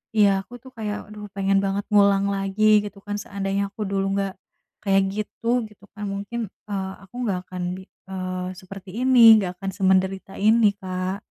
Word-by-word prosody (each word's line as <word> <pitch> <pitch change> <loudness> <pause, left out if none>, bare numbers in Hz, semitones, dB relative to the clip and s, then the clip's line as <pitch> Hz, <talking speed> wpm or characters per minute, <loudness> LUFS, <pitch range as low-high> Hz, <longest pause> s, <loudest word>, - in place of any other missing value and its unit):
iya 200 -2 +4
aku 240 +5 -12
tuh 260 +2 -15
kayak 210 -2 -4
aduh 210 -1 -9
pengen 195 0 +2
banget 200 +1 -1
ngulang 200 -1 +5
lagi 205 +2 +3
gitu 205 0 -8
kan 205 0 -3
seandainya 200 0 -2
aku 210 +1 -5
dulu 195 0 -1
gak 195 -1 -1 0.5
kayak 195 -1 +3
gitu, 230 +3 -1
gitu 205 -1 -19
kan 210 0 -6
mungkin, 205 +3 -4 0.2
eee, 190 -1 -3
aku 195 - -18
nggak 195 -5 0
akan 185 -1 -5 0.2
bi 190 - -9 0.3
eee, 185 -1 -4
seperti 190 0 -10
ini, 235 -4 +9
nggak 180 -2 -4
akan 195 - -2
semenderita 190 0 +1
ini 215 0 +5
Kak. 185 0 -4
200 Hz, 175 wpm, -24 LUFS, 195-210 Hz, 0.5 s, ini